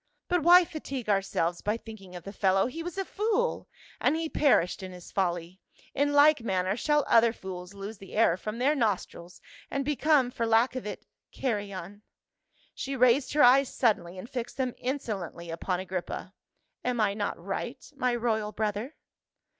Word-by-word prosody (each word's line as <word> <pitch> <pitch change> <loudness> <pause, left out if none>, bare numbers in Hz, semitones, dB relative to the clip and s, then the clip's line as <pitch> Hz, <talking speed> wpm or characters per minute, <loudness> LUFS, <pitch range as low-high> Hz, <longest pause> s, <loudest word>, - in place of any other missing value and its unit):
" - - -51
But 355 -2 +2
why 350 +3 +7
fatigue 275 -8 -6
ourselves 190 -4 0
by 210 +2 0
thinking 205 -6 -11
of 175 - -8
the 200 - -8
fellow; 195 -1 +2
he 300 +7 -5
was 350 +3 -6
a 390 - -1
fool, 445 +5 -1 0.3
and - - +2
he 325 0 -2
perished 225 - +2
in 185 -1 -7
his 180 -1 -11
folly; 175 -1 -2 0.3
in 285 +1 +1
like 290 -1 +6
manner 190 -3 0
shall 295 +4 +2
other 230 0 +5
fools 185 -3 -8
lose 200 +1 -7
the 195 - -12
air 215 -6 +4
from 215 +4 -5
their 265 +5 +3
nostrils 190 - -2 0.3
and 275 -1 -2
become 295 -3 +3
for 230 -2 -2
lack 230 +3 +3
of 255 -4 -4
it - - -7 0.2
— - - -63
carrion." 205 -5 -3 0.7
She 275 +1 -4
raised 255 +2 +3
her 295 - +5
eyes 260 +2 +6
suddenly 185 -7 0
and 185 - -7
fixed 245 -2 -5
them 255 -2 -1
insolently 200 - -4
upon 180 +2 -2
Agrippa. 185 -1 -5 0.3
" - - -50
Am 250 -1 -1
I 205 -2 +2
not 205 0 -2
right, - - -4 0.2
my 250 -3 +1
royal 220 -3 -1
brother?" 215 +6 -3
225 Hz, 180 wpm, -28 LUFS, 190-275 Hz, 0.7 s, why